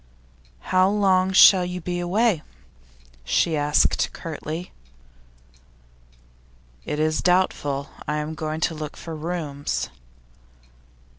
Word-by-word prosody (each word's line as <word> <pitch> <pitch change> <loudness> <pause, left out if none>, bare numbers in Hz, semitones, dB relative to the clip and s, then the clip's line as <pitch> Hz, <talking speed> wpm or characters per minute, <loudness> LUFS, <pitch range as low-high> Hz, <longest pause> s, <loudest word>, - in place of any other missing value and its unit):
'How 185 +1 +5
long 190 -2 +2
shall 190 -1 +7
you 180 0 -4
be 175 +1 -4
away?' 190 0 +1 0.8
she 160 - +1
asked, 145 0 +2
curtly. 165 +1 -6 2.1
'It 150 - -3
is 155 0 +1
doubtful. 145 -6 0 0.2
I 150 +1 -1
am 150 +1 -3
going 155 0 -4
to 165 - +1
look 155 -1 -7
for 165 -1 -7
rooms. 155 -3 -3
165 Hz, 100 wpm, -23 LUFS, 150-185 Hz, 2.1 s, shall